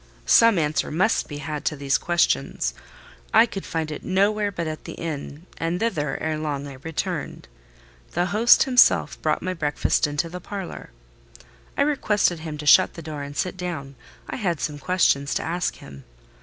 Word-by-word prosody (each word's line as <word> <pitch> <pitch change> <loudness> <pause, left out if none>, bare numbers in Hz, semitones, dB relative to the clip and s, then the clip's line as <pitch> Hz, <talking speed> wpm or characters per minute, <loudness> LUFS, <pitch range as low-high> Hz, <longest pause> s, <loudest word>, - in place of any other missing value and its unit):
Some 230 -4 +6
answer 155 -2 0
must 185 +8 +1
be 145 - -7
had 150 0 -5
to 150 - 0
these 140 -1 0
questions. 175 0 0 0.6
I 225 +1 +8
could 195 -4 -7
find 160 -1 -2
it 150 - -6
nowhere 205 +2 +1
but 170 -3 -4
at 155 -1 -6
the - - -6
inn, 155 0 -6
and 165 +2 -1
thither, 150 -11 -1
ere 155 -1 -2
long, 145 -2 -3
I 135 -2 -9
returned. 160 +1 -4 0.7
The 175 +1 +1
host 230 +3 +6
himself 255 -2 +4
brought - - 0
my 185 - -1
breakfast 150 -3 0
into 145 +3 -2
the 180 +2 -8
parlour. 195 0 -7 0.9
I - - +4
requested 210 - +1
him 155 -1 -6
to 150 - -7
shut 185 +5 +6
the 165 - -8
door 150 -2 -6
and 140 0 -7
sit 185 - -1
down: 170 -7 -5 0.3
I - - -5
had 175 - -1
some 150 -1 -3
questions 145 -5 +1
to - - -1
ask 170 +1 -2
him. 70 -1 -12
165 Hz, 180 wpm, -24 LUFS, 150-185 Hz, 0.9 s, I